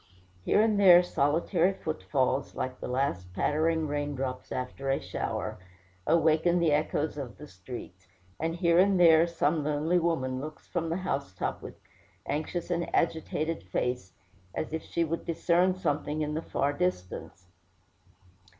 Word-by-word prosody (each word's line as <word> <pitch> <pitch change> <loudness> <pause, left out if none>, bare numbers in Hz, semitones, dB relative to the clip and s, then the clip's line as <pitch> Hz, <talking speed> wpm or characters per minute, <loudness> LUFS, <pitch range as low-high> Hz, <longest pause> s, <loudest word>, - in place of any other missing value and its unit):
Here 210 - +4
and 215 -2 +2
there 180 -3 +8
solitary 170 +4 +1
footfalls, 140 -5 -1
like 130 0 -4
the - - -5
last 125 -9 -1
pattering 160 +4 +1
rain 145 0 -2
drops 130 -1 -4
after 130 +2 -4
a 135 - +2
shower, 90 0 -4 0.5
awaken 165 +1 +3
the 170 -3 +3
echoes 150 0 0
of 130 -4 -7
the 150 - -9
streets; 95 -2 -10 0.3
and 165 +1 -1
here 170 0 +3
and 195 0 +4
there 165 -1 +7
some 165 -2 0
lonely 150 +4 +1
woman 130 -7 -1
looks 155 +1 -8
from 165 -2 -2
the 165 - -1
housetop 135 - -3
with - - -9 0.5
anxious 160 +4 -3
and 170 0 -1
agitated 160 0 0
face, 125 -6 -3 0.4
as 155 - -3
if 160 - -2
she 170 - -1
would 165 +1 -3
discern 175 +2 +2
something 150 -3 -1
in 150 0 -2
the 160 - -2
far 140 -3 -1
distance. 95 - -3
155 Hz, 150 wpm, -29 LUFS, 135-170 Hz, 0.5 s, there